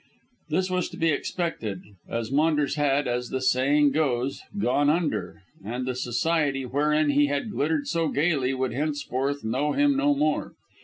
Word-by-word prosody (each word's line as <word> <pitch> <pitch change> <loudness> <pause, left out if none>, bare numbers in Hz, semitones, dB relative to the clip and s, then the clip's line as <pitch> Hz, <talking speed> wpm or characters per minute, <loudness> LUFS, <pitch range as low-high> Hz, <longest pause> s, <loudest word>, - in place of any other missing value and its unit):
This 185 +4 +1
was 180 -1 0
to 170 - -10
be 165 -2 +2
expected, 145 - -2 0.3
as 115 0 -3
Maunders 150 -1 +2
had, 145 -1 +1
as 125 0 -2
the 130 - -2
saying 140 +3 +3
goes, 135 -3 0 0.2
"gone 145 -4 +2
under," 150 - -1 0.2
and 120 +5 -4
the 130 - -1
society 135 +3 0
wherein 150 +3 +2
he 145 +1 +3
had 145 +9 -2
glittered 155 -4 0
so 165 -1 0
gaily 140 -4 +1
would 130 -1 -1
henceforth 145 -1 -2
know 130 +7 0
him 285 0 +3
no 290 +1 +2
more. 295 +2 0
145 Hz, 160 wpm, -26 LUFS, 130-160 Hz, 0.3 s, saying